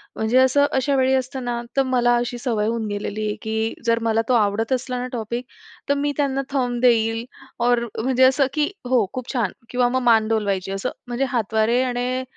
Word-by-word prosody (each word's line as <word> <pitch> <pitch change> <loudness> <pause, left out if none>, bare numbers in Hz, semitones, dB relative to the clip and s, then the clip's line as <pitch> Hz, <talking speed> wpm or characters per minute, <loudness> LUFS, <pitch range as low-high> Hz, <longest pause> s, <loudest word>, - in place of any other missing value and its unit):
म्हणजे 220 +3 +1
असं 260 +2 +5
अशा 270 +1 +1
वेळी 265 0 +3
असताना, 250 -2 -2 0.2
तर 270 - +5
मला 240 -2 +2
अशी 240 0 -2
सवय 225 -4 -1
होऊन 230 -1 -1
गेलेली 205 +1 -3
आहे 210 - -2
की 220 +1 -2
जर 230 0 +2
मला 225 0 +2
तो - - +4
आवडत 220 +2 +1
असला 255 0 -2
ना 250 - -3
टॉपिक, 235 +1 -4 0.4
तर - - +5
मी 285 +1 0
त्यांना 275 -2 0
थंब 250 -3 -1
देईल 225 -2 +3 0.4
और 245 -1 +4 0.2
म्हणजे 260 +2 +2
असं 260 +1 +4
की 300 +1 +1 0.2
हो 245 -5 +3
खूप 255 +1 -5
छान 230 -7 0 0.2
किंवा 245 0 +2
मग 260 +1 0
मान 225 -2 +4
डोलवायची. 200 -4 -1
असं 195 +6 -2 0.2
म्हणजे 245 +3 -1
हातवारे 230 0 +1
आणि 250 +1 -1
245 Hz, 195 wpm, -22 LUFS, 225-260 Hz, 0.4 s, असं